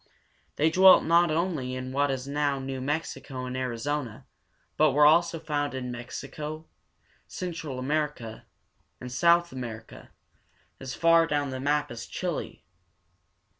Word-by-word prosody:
They 155 +2 +2
dwelt 185 +2 +7
not 170 +1 +4
only 155 -6 -1
in 130 0 -5
what 140 +2 +1
is 135 0 -3
now 145 0 0
New 135 -1 -5
Mex´i 150 +5 -3
co 130 -2 -6
and 125 0 -5
Ar 130 -1 -2
i - - -5
zo´na, 135 -2 -4 0.5
but - - +3
were 145 +1 +5
also 170 +2 +4
found 145 -3 -2
in 125 -1 -4
Mexico, 150 +6 -7 0.6
Central 165 -7 -5
America, 135 -4 -3 0.5
and 125 - -8
South 170 +6 +3
America, 115 -3 -8 0.7
as 130 0 -6
far 165 0 +4
down 145 -3 -1
the 130 - -5
map 145 +1 0
as 115 -1 -7
Chile 180 -4 -4 0.8
(che´lā). - - -46
145 Hz, 150 wpm, -27 LUFS, 130-155 Hz, 0.8 s, dwelt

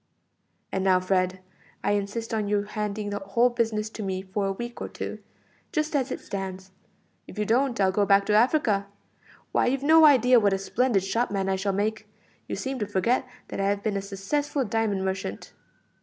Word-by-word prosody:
"And 190 - -1
now, 185 -1 +4
Fred, 185 0 0 0.4
I - - +1
insist 205 +3 -2
on 215 -2 0
your 205 0 +1
handing 210 0 -4
the 205 - -2
whole 235 +5 +2
business 220 -3 0
over - - -29
to - - -6
me 190 -2 -3
for 195 +1 -2
a - - 0
week 240 +4 -6
or - - -4
two, - - -6 0.5
just 305 -4 -1
as 270 -1 +1
it - - -4
stands; 190 -1 -6 0.6
if - - -12
you 210 - 0
don't 245 +2 +1
I'll 190 -1 +4
go 200 +1 +1
back 200 0 +5
to 210 - +1
Africa. 215 -3 +3 0.6
Why, - - +2
you've 270 +2 0
no 320 +2 +7
idea 255 -4 +6
what 205 -2 +2
a - - +1
splendid 210 +1 +1
shopman 195 -1 -1
I 190 - +2
shall 195 +1 -1
make. 210 +3 -2 0.4
You - - -3
seem 265 -1 -4
to 210 - -2
forget 220 +6 +1 0.2
that - - -5
I - - +1
have 200 0 0
been 215 -2 -1
a 195 - -1
successful 260 +9 -2
diamond 210 -3 0
merchant." 190 - -4
205 Hz, 200 wpm, -26 LUFS, 195-240 Hz, 0.6 s, no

